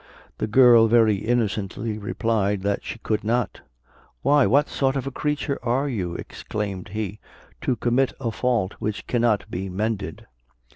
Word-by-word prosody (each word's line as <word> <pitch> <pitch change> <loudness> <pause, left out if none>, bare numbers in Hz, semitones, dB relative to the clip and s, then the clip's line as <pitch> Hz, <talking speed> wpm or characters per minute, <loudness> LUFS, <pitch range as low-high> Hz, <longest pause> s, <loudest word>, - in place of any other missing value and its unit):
The - - -1
girl 120 0 +7
very 110 -2 +4
innocently 110 -1 -1
replied 105 -2 0
that 100 0 -1
she - - -6
could 110 -2 -2
not. 120 +2 -1 0.6
"Why, 145 -1 +5
what 140 +7 +4
sort 135 -1 0
of 135 - -2
a 135 - -3
creature 150 0 -2
are 125 +4 0
you," 95 -10 -3
exclaimed 100 -3 -5
he, 105 0 -4 0.4
"to 130 - 0
commit 125 +3 +1
a 120 -4 -2
fault 115 -4 0
which 100 -2 -3
cannot 115 -4 +1
be 95 +2 -3
mended?" 100 -2 -3
110 Hz, 150 wpm, -24 LUFS, 100-125 Hz, 0.6 s, girl